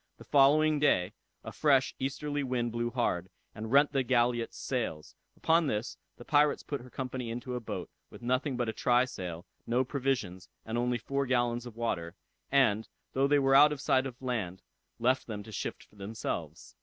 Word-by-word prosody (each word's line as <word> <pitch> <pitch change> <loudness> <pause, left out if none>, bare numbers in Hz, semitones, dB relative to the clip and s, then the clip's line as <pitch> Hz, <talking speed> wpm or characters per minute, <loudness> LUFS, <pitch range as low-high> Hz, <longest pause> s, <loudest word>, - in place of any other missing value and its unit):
The - - -12
day - - -27
following, 150 +2 +5
a 105 -1 -1
fresh 135 +2 +3
easterly 145 +2 -2
wind 125 -3 -1
blew 120 +1 -1
hard, 95 -7 -1 0.2
and 110 +1 -6
rent 145 +2 +5
the 135 -2 +1
galliot's 120 -2 +1
sails; 115 - -3 0.2
upon 165 -1 +3
this 110 -1 -2 0.2
the 120 - -12
pirates 150 0 +3
put 145 -3 -4
her 125 - -13
company 130 -2 -4
into 120 +2 -5
a 125 - -2
boat, 115 - -5 0.2
with - - -13
nothing 130 +2 0
but 120 -1 0
a 110 - -2
try 125 +1 +3
sail, 90 -7 -6 0.2
no 125 +2 +2
provisions, 125 -10 -2 0.2
and 110 - -4
only 120 0 +1
four 140 +3 -2
gallons 120 -1 0
of 115 - -10
water, 85 -8 -2 0.4
and, 110 -6 +3 0.3
though 135 +1 +3
they 145 +1 +4
were 135 -1 +3
out 145 +2 +8
of 150 - -4
sight 130 0 +2
of 125 -2 -10
land, 100 -8 -3 0.3
left 130 +3 +1
them 105 -3 -5
to 110 - -11
shift - - -5
for 105 - -24
themselves. 100 +3 -5
125 Hz, 190 wpm, -30 LUFS, 115-135 Hz, 0.4 s, out